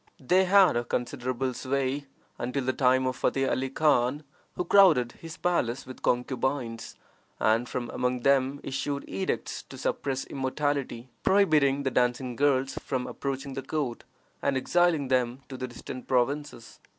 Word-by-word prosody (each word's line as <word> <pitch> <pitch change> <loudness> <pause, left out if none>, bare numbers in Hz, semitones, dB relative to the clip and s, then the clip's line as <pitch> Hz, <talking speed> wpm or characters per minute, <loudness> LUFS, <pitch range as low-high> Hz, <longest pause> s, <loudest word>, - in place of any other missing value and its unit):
They 180 +8 +3
had 185 -11 +4
considerable 130 +1 -2
sway 135 +2 -2 0.3
until 125 +2 -2
the 130 - +1
time 130 0 +3
of 130 -1 -1
Futteh 135 0 +1
Ali 130 0 -1
Khan, 145 -1 +2 0.3
who 180 - -2
crowded 165 -11 +5
his 165 -1 -10
palace 130 -8 0
with 130 0 -10
concubines, 125 -2 -1 0.4
and 115 +3 +2
from 120 -2 -4
among 125 0 -1
them 135 +1 +2
issued 140 +1 -3
edicts 95 0 -3
to - - -12
suppress 135 -1 -2
immorality, 135 -2 -2
prohibiting 150 -8 +3
the 135 - 0
dancing 125 0 0
girls 135 0 +1
from 130 -2 -2
approaching 135 0 -4
the 135 - -4
court, 135 -3 -3 0.4
and 140 -1 +1
exiling 165 0 +2
them 125 0 +1
to 135 - -6
the 130 0 -4
distant 125 +1 -9
provinces. 135 -1 -1
130 Hz, 145 wpm, -28 LUFS, 125-145 Hz, 0.4 s, crowded